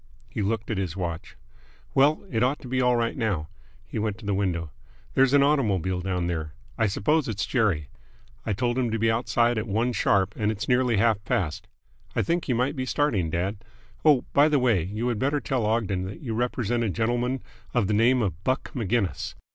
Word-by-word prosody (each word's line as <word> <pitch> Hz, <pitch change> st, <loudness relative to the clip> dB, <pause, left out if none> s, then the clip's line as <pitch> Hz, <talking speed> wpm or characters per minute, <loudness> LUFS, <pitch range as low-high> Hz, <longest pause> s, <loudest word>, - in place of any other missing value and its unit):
He 110 Hz, -, -3 dB
looked 105 Hz, +2 st, -1 dB
at 105 Hz, -, -1 dB
his 95 Hz, -2 st, -3 dB
watch. 85 Hz, -3 st, -5 dB, 0.6 s
"Well, 145 Hz, +6 st, +3 dB
it 115 Hz, -3 st, 0 dB
ought 130 Hz, +4 st, +2 dB
to -, -, -9 dB
be 130 Hz, +1 st, 0 dB
all 125 Hz, -1 st, +3 dB
right 115 Hz, -1 st, 0 dB
now." 100 Hz, -11 st, -1 dB, 0.4 s
He -, -, -5 dB
went 105 Hz, -1 st, -1 dB
to 110 Hz, -, -12 dB
the 100 Hz, -, 0 dB
window. 85 Hz, -5 st, -1 dB, 0.4 s
"There's 135 Hz, 0 st, +4 dB
an 140 Hz, -, +6 dB
automobile 100 Hz, -, +1 dB
down 90 Hz, -2 st, -1 dB
there. 80 Hz, -3 st, -3 dB, 0.2 s
I 110 Hz, -, +2 dB
suppose 150 Hz, +10 st, +1 dB
it's 105 Hz, -2 st, -2 dB
Jerry. 95 Hz, -, +1 dB, 0.6 s
I -, -, -2 dB
told 120 Hz, +4 st, 0 dB
him 125 Hz, -2 st, +1 dB
to 115 Hz, -, -1 dB
be 115 Hz, 0 st, +2 dB
outside 120 Hz, 0 st, +1 dB
at 110 Hz, -, -4 dB
one 115 Hz, +4 st, 0 dB
sharp 100 Hz, -2 st, +2 dB
and 105 Hz, 0 st, 0 dB
it's 105 Hz, -1 st, -4 dB
nearly 125 Hz, -2 st, +3 dB
half 110 Hz, -1 st, +2 dB
past. 90 Hz, -6 st, -2 dB, 0.5 s
I -, -, +2 dB
think 170 Hz, +1 st, -1 dB
you 125 Hz, -, +2 dB
might 130 Hz, +5 st, 0 dB
be 130 Hz, -1 st, -3 dB
starting, 115 Hz, -, +1 dB
dad. 95 Hz, +6 st, -2 dB, 0.4 s
Oh, 150 Hz, -5 st, +5 dB
by 145 Hz, +2 st, +5 dB
the 150 Hz, -, +3 dB
way, 120 Hz, -8 st, +3 dB
you 105 Hz, +8 st, -3 dB
had 115 Hz, -3 st, -1 dB
better 140 Hz, +3 st, +1 dB
tell 125 Hz, -6 st, -1 dB
Ogden 100 Hz, -5 st, 0 dB
that 95 Hz, +1 st, -8 dB
you 115 Hz, -5 st, -4 dB
represent 120 Hz, 0 st, 0 dB
a 110 Hz, -, 0 dB
gentleman 120 Hz, +5 st, -1 dB, 0.3 s
of 120 Hz, -4 st, +3 dB
the 105 Hz, -, 0 dB
name 120 Hz, +3 st, +4 dB
of 90 Hz, -3 st, -3 dB
Buck 130 Hz, +3 st, -1 dB
Maginnis. 115 Hz, -4 st, -1 dB
115 Hz, 210 wpm, -26 LUFS, 100-125 Hz, 0.6 s, an